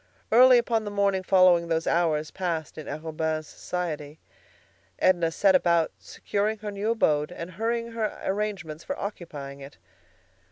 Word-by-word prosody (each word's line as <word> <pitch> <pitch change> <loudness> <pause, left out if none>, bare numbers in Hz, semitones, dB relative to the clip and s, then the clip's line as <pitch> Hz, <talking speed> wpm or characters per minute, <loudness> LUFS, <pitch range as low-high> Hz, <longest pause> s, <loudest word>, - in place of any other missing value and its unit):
Early 250 +2 +8
upon 230 -2 +1
the 210 - -4
morning 200 -2 +1
following 185 -2 +4
those 165 0 0
hours 155 -3 +1
passed 165 -5 -3
in 155 - -8
Arobin's 155 +1 -3
society, 155 -3 -5 0.8
Edna 175 -3 +3
set 195 +3 +3
about 170 -3 +3
securing 210 +2 -2
her 210 0 -6
new 200 +2 -2
abode 150 -9 +1
and 175 0 -7
hurrying 230 +4 -2
her 225 -2 -3
arrangements 190 -6 -3
for 280 - -4
occupying 145 -9 -7
it. 140 +1 -11
180 Hz, 145 wpm, -26 LUFS, 160-210 Hz, 0.8 s, Early